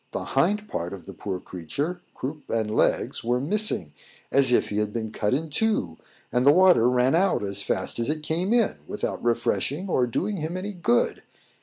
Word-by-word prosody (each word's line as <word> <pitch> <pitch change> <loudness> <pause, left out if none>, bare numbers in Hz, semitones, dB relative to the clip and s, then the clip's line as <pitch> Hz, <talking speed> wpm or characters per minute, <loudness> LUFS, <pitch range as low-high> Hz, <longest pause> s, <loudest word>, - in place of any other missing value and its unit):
the - - -2
hind 205 +11 +2
part 85 - -4
of 90 -4 -9
the - - -9
poor 95 -3 -4
creature 140 - -4
croup 145 +3 -6
and 110 -1 -1
legs - - +1
were 120 +2 +1
missing, 150 - 0 0.4
as 135 -2 +4
if 120 - +3
he 105 - -1
had 105 -1 -1
been 110 -1 -4
cut 105 -1 -1
in 150 +5 0
two, 150 - 0 0.4
and 125 - +2
the 140 - +7
water 175 -8 +6
ran 125 +2 +3
out 185 - +2
as 100 0 -2
it 130 +10 -1
came 170 +6 -1
in, 235 -2 +2
without 210 - -4
refreshing 120 +8 0
or 130 -9 +2
doing 195 - -2
him 165 +2 -3
any 200 +3 -4
good! 120 -10 +1
135 Hz, 185 wpm, -25 LUFS, 110-180 Hz, 0.4 s, the